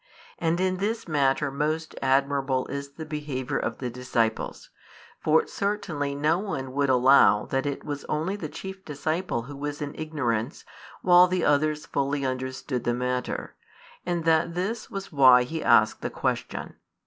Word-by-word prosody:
And 165 Hz, +1 st, +1 dB
in 185 Hz, 0 st, +1 dB
this 220 Hz, +3 st, -2 dB
matter 140 Hz, -2 st, +1 dB
most 155 Hz, +3 st, -2 dB
admirable 135 Hz, -1 st, +1 dB
is 140 Hz, 0 st, -5 dB
the 160 Hz, +2 st, -7 dB
behaviour 145 Hz, -3 st, -3 dB
of -, -, -3 dB
the 125 Hz, -2 st, -4 dB
disciples. 115 Hz, -2 st, -2 dB, 0.5 s
For 155 Hz, +1 st, +3 dB
certainly 170 Hz, -9 st, -2 dB
no 155 Hz, +4 st, +2 dB
one 135 Hz, -10 st, -4 dB
would 140 Hz, 0 st, +1 dB
allow 130 Hz, -4 st, +5 dB
that 135 Hz, +1 st, -1 dB
it 140 Hz, -, -3 dB
was 145 Hz, -1 st, -5 dB
only 160 Hz, +6 st, -1 dB
the 165 Hz, -7 st, -5 dB
chief 190 Hz, +3 st, -8 dB
disciple 155 Hz, -2 st, -2 dB
who 140 Hz, +4 st, -9 dB
was 145 Hz, +1 st, -4 dB
in 145 Hz, 0 st, -4 dB
ignorance 140 Hz, -6 st, -2 dB, 0.4 s
while 180 Hz, 0 st, +7 dB
the 180 Hz, -1 st, 0 dB
others 150 Hz, +1 st, +2 dB
fully 140 Hz, 0 st, -1 dB
understood 130 Hz, -1 st, -3 dB
the 120 Hz, -, 0 dB
matter, 125 Hz, 0 st, -3 dB, 0.5 s
and 170 Hz, -2 st, -2 dB
that 165 Hz, +1 st, +2 dB
this 215 Hz, +6 st, -3 dB
was 195 Hz, -2 st, -6 dB
why 130 Hz, -4 st, +7 dB
he 160 Hz, +6 st, -4 dB
asked 110 Hz, -2 st, +4 dB
the -, -, -2 dB
question. -, -, -3 dB
145 Hz, 160 wpm, -26 LUFS, 130-165 Hz, 0.5 s, while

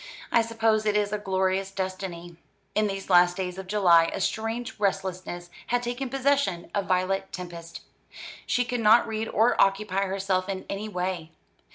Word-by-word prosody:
I 230 Hz, -, +5 dB
suppose 225 Hz, -1 st, +1 dB
it 210 Hz, 0 st, +3 dB
is 205 Hz, 0 st, 0 dB
a 210 Hz, -, -1 dB
glorious 190 Hz, -1 st, 0 dB
destiny." 185 Hz, -3 st, -5 dB, 0.4 s
In 215 Hz, 0 st, +2 dB
these 195 Hz, -1 st, -5 dB
last 175 Hz, 0 st, +5 dB
days 185 Hz, -1 st, -4 dB
of 190 Hz, -, -8 dB
July 180 Hz, -5 st, +5 dB
a -, -, -4 dB
strange 225 Hz, +5 st, -2 dB
restlessness 185 Hz, -3 st, -2 dB, 0.2 s
had 245 Hz, 0 st, 0 dB
taken 245 Hz, +2 st, -3 dB
possession 270 Hz, -10 st, 0 dB
of 200 Hz, -1 st, -1 dB
Violet 190 Hz, +1 st, 0 dB
Tempest. 170 Hz, -2 st, -8 dB, 0.7 s
She 245 Hz, -, +1 dB
could 245 Hz, +1 st, -2 dB
not 225 Hz, +2 st, +6 dB
read 220 Hz, 0 st, -3 dB
or 225 Hz, +3 st, +3 dB
occupy 195 Hz, 0 st, +2 dB
herself 190 Hz, -1 st, -1 dB
in 190 Hz, -1 st, -4 dB
any 210 Hz, +2 st, -4 dB
way. 180 Hz, -4 st, -3 dB
195 Hz, 165 wpm, -26 LUFS, 185-220 Hz, 0.7 s, not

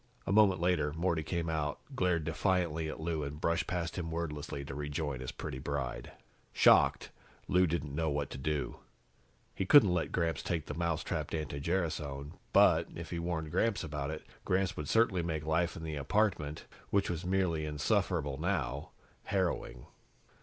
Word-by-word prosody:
A -, -, -1 dB
moment 100 Hz, -3 st, +5 dB
later, 85 Hz, -4 st, +2 dB
Morty 85 Hz, 0 st, 0 dB
came 85 Hz, +1 st, -2 dB
out, 80 Hz, -2 st, -1 dB, 0.2 s
glared 90 Hz, -5 st, +1 dB
defiantly 80 Hz, -1 st, 0 dB
at -, -, -6 dB
Lou 80 Hz, -1 st, -1 dB
and 75 Hz, +1 st, -5 dB
brushed 85 Hz, +1 st, +1 dB
past 85 Hz, 0 st, -2 dB
him 80 Hz, -2 st, -3 dB
wordlessly 75 Hz, -4 st, -4 dB
to 70 Hz, -, -6 dB
rejoin 75 Hz, -1 st, -3 dB
his 65 Hz, -, -5 dB
pretty 65 Hz, -, -6 dB
bride. 65 Hz, -3 st, -3 dB, 0.4 s
Shocked, -, -, +5 dB, 0.4 s
Lou 90 Hz, 0 st, +4 dB
didn't 75 Hz, -3 st, -2 dB
know 80 Hz, +1 st, 0 dB
what 70 Hz, -2 st, -2 dB
to -, -, -6 dB
do. 75 Hz, +1 st, -2 dB, 0.8 s
He -, -, -2 dB
couldn't 105 Hz, -10 st, +8 dB
let 85 Hz, -, 0 dB
Gramps 85 Hz, -5 st, 0 dB
take 85 Hz, -4 st, -2 dB
the -, -, -5 dB
mousetrapped 85 Hz, 0 st, -2 dB
anti 75 Hz, -3 st, -3 dB
gerasone 75 Hz, -4 st, -2 dB, 0.2 s
but, -, -, +5 dB
if -, -, -7 dB
he 85 Hz, -, -2 dB
warned 85 Hz, -2 st, -2 dB
Gramps 100 Hz, +4 st, +1 dB
about 75 Hz, -2 st, -3 dB
it, 80 Hz, 0 st, -6 dB, 0.2 s
Gramps 95 Hz, +1 st, +1 dB
would 75 Hz, -1 st, -5 dB
certainly 110 Hz, -6 st, +3 dB
make 80 Hz, -3 st, -3 dB
life 85 Hz, +2 st, +1 dB
in 80 Hz, -, -7 dB
the 80 Hz, -2 st, -4 dB
apartment, 75 Hz, -1 st, 0 dB, 0.2 s
which 100 Hz, 0 st, +2 dB
was 85 Hz, 0 st, -3 dB
merely 90 Hz, -4 st, +1 dB
insufferable 75 Hz, -2 st, 0 dB
now, 75 Hz, -6 st, -1 dB, 0.4 s
harrowing. 85 Hz, -10 st, -1 dB
80 Hz, 165 wpm, -32 LUFS, 75-90 Hz, 0.8 s, couldn't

